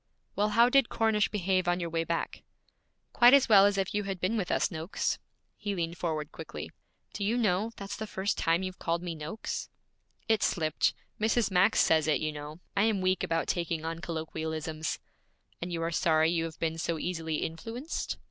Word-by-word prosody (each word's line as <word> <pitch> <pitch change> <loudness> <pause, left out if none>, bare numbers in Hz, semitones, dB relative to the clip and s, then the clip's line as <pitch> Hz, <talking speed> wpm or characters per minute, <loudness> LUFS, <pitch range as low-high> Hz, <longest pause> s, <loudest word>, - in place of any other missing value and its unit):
'Well, 210 +1 +2
how 235 +3 +5
did 270 -1 +4
Cornish 220 -2 +2
behave 185 -3 0
on 175 +1 +2
your 170 -2 -3
way 165 0 0
back?' 165 0 -3 0.7
'Quite 245 +3 +8
as 275 - +4
well 200 -3 +8
as 205 -1 0
if 195 -1 -1
you 205 -1 -1
had 195 -2 -3
been 185 +5 0
with 200 -5 -1
us, - - +1
Noakes.' 165 +3 -2 0.4
He 205 -2 -3
leaned 170 -1 -3
forward 155 -3 -2
quickly. - - -7 0.4
'Do 205 - -3
you 220 +4 +1
know, 215 -1 +1
that's 200 0 -5
the 220 - -5
first 195 0 -1
time 165 +3 +1
you've 185 0 -5
called 170 +1 -1
me 175 -2 -3
"Noakes"?' 160 +7 -5 0.6
'It 220 -1 +3
slipped. 155 -3 +1 0.2
Mrs. 220 -1 +2
Max 185 +4 +4
says 160 -1 +3
it, 155 - +3
you 155 0 -1
know; 150 +2 -8
I 200 +1 +4
am 220 -3 +2
weak 185 0 +2
about 165 0 0
taking 170 -2 -1
on 165 0 -3
colloquialisms.' 160 -2 -3 0.6
'And 175 +1 -4
you 165 -1 -2
are 165 - -1
sorry 160 -1 +3
you 165 -1 0
have 165 -1 -7
been 165 0 -2
so 165 0 -1
easily 165 -1 -2
influenced?' 225 - -4
175 Hz, 195 wpm, -30 LUFS, 165-205 Hz, 0.7 s, Quite